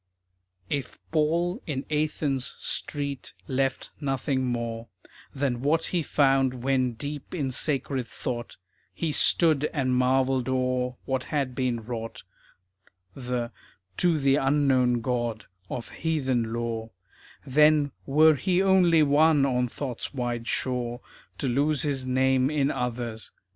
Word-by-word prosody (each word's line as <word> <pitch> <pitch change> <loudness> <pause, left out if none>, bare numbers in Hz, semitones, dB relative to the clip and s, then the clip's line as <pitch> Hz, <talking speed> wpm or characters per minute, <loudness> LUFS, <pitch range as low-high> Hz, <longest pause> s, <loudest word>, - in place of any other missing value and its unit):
If 140 -3 -3
Paul 165 +3 +1
in 140 -3 -3
Athens' 150 -3 0
street 140 -3 -3
left 135 0 -1
nothing 135 -1 -1
more 115 -1 -3 0.5
Than 130 -3 -1
what 160 +4 +2
he 175 - +2
found 135 -4 +2
when 130 -2 +1
deep 145 +7 -6
in 140 -6 -1
sacred 135 -2 0
thought, 120 -1 -5 0.4
He 165 -2 -1
stood 150 0 +3
and 130 -4 0
marvelled 130 0 +2
o'er 125 -1 0
what 130 -1 -1
had 140 -4 -1
been 125 -3 -1
wrought, 115 -1 -6 0.9
The 125 -2 -3 0.5
To 175 -3 +3
the 135 -1 +3
Unknown 135 -4 +2
God 120 -2 -2 0.2
of 120 - -5
heathen 130 -8 -1
lore, 115 -1 -3 0.6
Then 150 +1 +4 0.2
were 155 +3 +6
he 175 +6 +1
only 185 -4 +5
one 150 0 +4
on 125 -2 +1
thought's 130 +2 -5
wide 120 -2 -3
shore 125 -1 -1 0.4
To 140 - -2
lose 145 +5 +1
his 135 -3 -1
name 130 0 +2
in 145 -1 +1
others. 120 -2 -3
135 Hz, 125 wpm, -26 LUFS, 125-145 Hz, 0.9 s, were